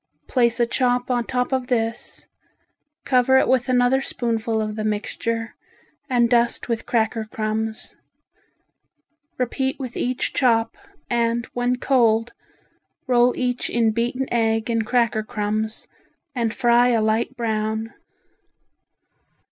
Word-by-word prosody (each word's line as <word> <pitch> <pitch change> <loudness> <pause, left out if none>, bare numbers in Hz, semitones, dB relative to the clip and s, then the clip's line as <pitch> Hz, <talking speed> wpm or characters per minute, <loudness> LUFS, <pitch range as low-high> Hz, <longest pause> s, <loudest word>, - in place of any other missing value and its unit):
Place 240 -2 +2
a 235 - +4
chop 245 +1 0
on 240 -1 0
top 250 0 -1
of 260 -2 -1
this, 230 -2 -2 0.8
cover 260 0 +4
it - - +3
with 255 0 +2
another 250 +1 +3
spoonful 230 -3 -2
of 215 -1 -3
the 215 - -3
mixture 225 +2 -2 0.6
and 240 -2 +3
dust 235 0 +1
with 230 -2 -3
cracker 225 -1 0
crumbs. 220 0 -4 1.4
Repeat 265 +2 -1
with 255 -3 -6
each 250 0 -2
chop, 230 -3 +2 0.3
and 235 -1 0
when 245 0 0
cold 235 -3 +2 0.7
roll 245 -2 +3
each 250 -1 -1
in 230 -2 +2
beaten 240 +4 -1
egg 225 0 +1
and 225 -1 0
cracker 235 -3 +2
crumbs, 215 +1 -3 0.5
and 235 -4 -1
fry 240 +2 +3
a 235 -2 +3
light 220 +4 0
brown. 220 -1 -2
235 Hz, 125 wpm, -22 LUFS, 225-250 Hz, 1.4 s, a